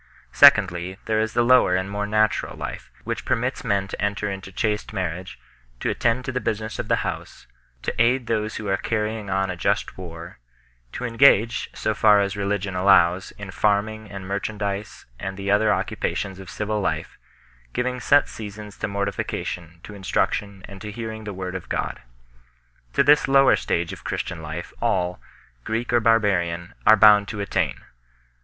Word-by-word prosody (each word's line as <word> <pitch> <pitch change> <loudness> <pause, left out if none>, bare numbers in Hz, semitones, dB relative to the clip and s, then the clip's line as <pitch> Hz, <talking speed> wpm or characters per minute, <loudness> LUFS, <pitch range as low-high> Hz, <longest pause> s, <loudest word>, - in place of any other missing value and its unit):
Secondly, 95 -9 +5
there 110 -1 +1
is 110 0 -1
the 120 - +4
lower 125 -6 +5
and 95 +1 -1
more 105 +1 -3
natural 110 +1 +1
life, - - -6
which - - -4
permits - - -1
men 100 -1 0
to - - -7
enter 100 0 -1
into 95 0 -7
chaste 105 +1 -2
marriage, 90 -2 -4 0.4
to - - -1
attend 120 +2 0
to - - -2
the 125 0 -2
business 110 +1 -3
of - - -3
the - - +1
house, - - -6 0.4
to - - -1
aid 125 +2 +3
those 110 -1 -1
who 110 - -5
are 95 0 +1
carrying 110 -2 -2
on 95 0 0
a - - -4
just 85 - -1
war, 85 -4 -9 0.5
to 125 - -5
engage, 120 -2 +4
so 110 - -1
far 105 -1 +5
as 100 0 0
religion 100 -1 -2
allows, 90 -1 +4
in 100 -2 -7
farming 105 +2 0
and 95 -2 -7
merchandize 100 0 -4
and 95 +1 -5
the 100 0 -2
other 105 +1 +4
occupations 100 -1 -2
of 95 -1 -10
civil 105 0 -2
life, 95 - -3 0.5
giving 125 - -2
set 140 +4 +4
seasons 105 -1 -9
to - - -1
mortification, 95 -4 -4
to 105 - -10
instruction, 100 0 -2
and 100 -1 -11
to 105 - -6
hearing 110 0 -6
the 105 - -4
Word 90 -1 -5
of 95 -2 -7
God. - - -3 0.9
To - - +4
this 145 +1 +5
lower 135 -1 +6
stage 85 0 -2
of - - -11
Christian 90 -3 -4
life 80 +3 -6
all, 90 -6 0 0.4
Greek 115 - -2
or 120 - +5
barbarian, 95 -7 +1
are 110 - +9
bound 105 -1 +7
to 105 - -5
attain. 100 -2 -1
100 Hz, 175 wpm, -23 LUFS, 95-110 Hz, 0.9 s, are